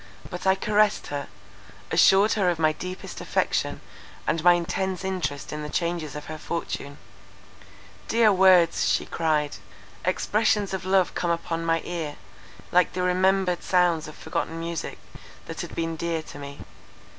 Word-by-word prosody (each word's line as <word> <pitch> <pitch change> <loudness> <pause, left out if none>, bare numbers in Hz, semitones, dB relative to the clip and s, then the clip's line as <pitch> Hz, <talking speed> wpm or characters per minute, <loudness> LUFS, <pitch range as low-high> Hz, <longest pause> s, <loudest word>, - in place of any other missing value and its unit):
but 180 +1 -4
I 190 - +5
caressed 210 +1 +2
her, 140 0 -3 0.6
assured 200 +3 +5
her 195 -4 +2
of 175 - 0
my 155 -1 +3
deepest 180 +3 -7
affection - - -1 0.4
and 160 0 0
my 175 0 +8
intense 185 +2 -2
interest 180 -8 -3
in 150 - -4
the 150 - -5
changes 170 -2 -2
of 150 - -6
her 155 0 -7
fortune:—"Dear 170 +8 -3
words," 185 -3 +5
she - - +1
cried, 155 -3 0 0.5
"expressions 210 -2 +1
of 185 -1 -3
love 190 -1 +3
come 175 - -1
upon 165 0 -1
my 165 0 +1
ear, 165 -4 -4 0.6
like 180 0 +3
the 180 - -1
remembered 185 0 +2
sounds 175 -4 +2
of 155 - -10
forgotten 160 +1 -3
music, 165 -1 -4 0.5
that - - -6
had - - -7
been 165 -1 -2
dear 165 -1 -2
to 145 - -11
me. 140 0 -8
175 Hz, 150 wpm, -25 LUFS, 160-190 Hz, 0.6 s, my